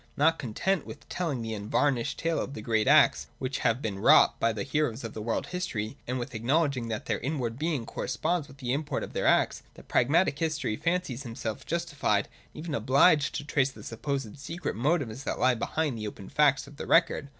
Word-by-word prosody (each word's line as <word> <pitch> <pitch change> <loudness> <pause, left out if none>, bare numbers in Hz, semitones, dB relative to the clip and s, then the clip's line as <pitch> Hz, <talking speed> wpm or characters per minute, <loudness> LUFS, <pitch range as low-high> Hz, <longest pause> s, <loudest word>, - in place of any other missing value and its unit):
Not 160 +3 +3
content 150 - -1
with 145 - -10
telling 150 -10 -2
the 110 0 -4
unvarnished 115 +4 0
tale 165 0 0
of 135 - -4
the 110 - -6
great 110 -2 +1
acts - - +5
which 130 0 -3
have 115 +4 +1
been 100 -3 -3
wrought - - +6
by 115 - +2
the 110 -2 -3
heroes 135 -3 -1
of 115 - -6
the 110 - -6
world's 115 +9 -2
history, 145 -13 -3
and 125 +1 -1
with 120 0 -5
acknowledging 130 +2 +1
that 110 -2 -4
their - - -1
inward 130 -3 -3
being 155 -6 -1
corresponds 155 +7 -2
with 135 - -15
the 125 -2 -2
import 145 +1 -2
of - - -8
their - - 0
acts, - - +3
the - - -13
pragmatic 145 +3 +2
historian 155 -9 -1
fancies 170 -7 -1
himself 115 -4 -5
justified 145 -11 0
and - - -25 0.2
even 155 0 -5
obliged 140 +5 +4
to - - -3
trace 140 -2 +1
the - - -13
supposed 135 0 -4
secret 165 +5 -4
motives 135 -1 0
that - - -2
lie 130 0 +4
behind 145 +4 -1
the 105 - -3
open 100 -2 -9
facts 140 -3 +3
of 140 +1 -14
the - - -6
record. 165 -4 +3
135 Hz, 205 wpm, -28 LUFS, 115-155 Hz, 0.2 s, wrought